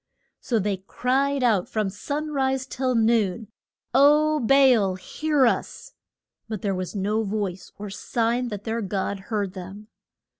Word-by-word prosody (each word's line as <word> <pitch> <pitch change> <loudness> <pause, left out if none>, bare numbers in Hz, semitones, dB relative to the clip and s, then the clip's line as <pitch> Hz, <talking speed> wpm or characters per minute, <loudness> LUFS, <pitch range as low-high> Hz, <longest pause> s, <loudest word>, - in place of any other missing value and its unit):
So 235 - -1
they 205 -1 0
cried 260 +8 0
out 215 -7 +2
from 215 -3 -1
sun 295 +9 -4
rise 265 -2 0
till 260 -1 -1
noon, 225 -2 +1 0.4
O 300 +3 +5
Ba 270 +1 +5
al 195 -5 +1
hear 290 +9 0
us! 235 - -2 0.6
But 215 -4 -5
there 200 -2 0
was 185 +2 -4
no 205 +3 0
voice 200 -3 -3
or 205 -1 -7
sign 235 +4 -1
that 205 -3 -6
their 230 0 -2
god 195 0 -2
heard 205 -4 -1
them. 195 +3 -9
225 Hz, 150 wpm, -24 LUFS, 200-265 Hz, 0.6 s, O